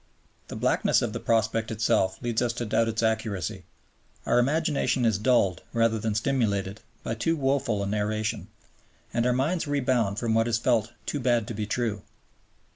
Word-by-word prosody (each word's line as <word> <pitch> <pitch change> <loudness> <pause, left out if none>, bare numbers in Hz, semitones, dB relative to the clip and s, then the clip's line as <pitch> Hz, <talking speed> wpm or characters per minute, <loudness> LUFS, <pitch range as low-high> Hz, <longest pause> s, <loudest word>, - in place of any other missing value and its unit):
The - - -7
blackness - - +2
of - - -2
the - - -3
prospect 115 0 0
itself 105 -4 +1
leads 120 -1 0
us 120 -1 0
to 120 0 -4
doubt 115 +1 +1
its 115 0 -1
accuracy; 110 -5 -2 0.6
our 120 +1 +3
imagination 140 -1 +1
is 110 -3 +2
dulled 105 -6 +2
rather 115 -1 +2
than 110 0 -2
stimulated 110 -5 0 0.2
by 115 - -2
too 140 +9 0
woeful 135 -7 0
a - - -2
narration, 105 +1 -2 0.7
and 120 +1 +1
our - - +3
minds 150 +6 0
rebound 125 -8 +1
from 115 -1 0
what 115 +1 +2
is 115 -1 +1
felt 115 -1 +1
"too 145 - -2
bad 120 -4 +1
to - - -3
be 105 0 -3
true." 110 -3 -1
115 Hz, 175 wpm, -26 LUFS, 110-125 Hz, 0.7 s, our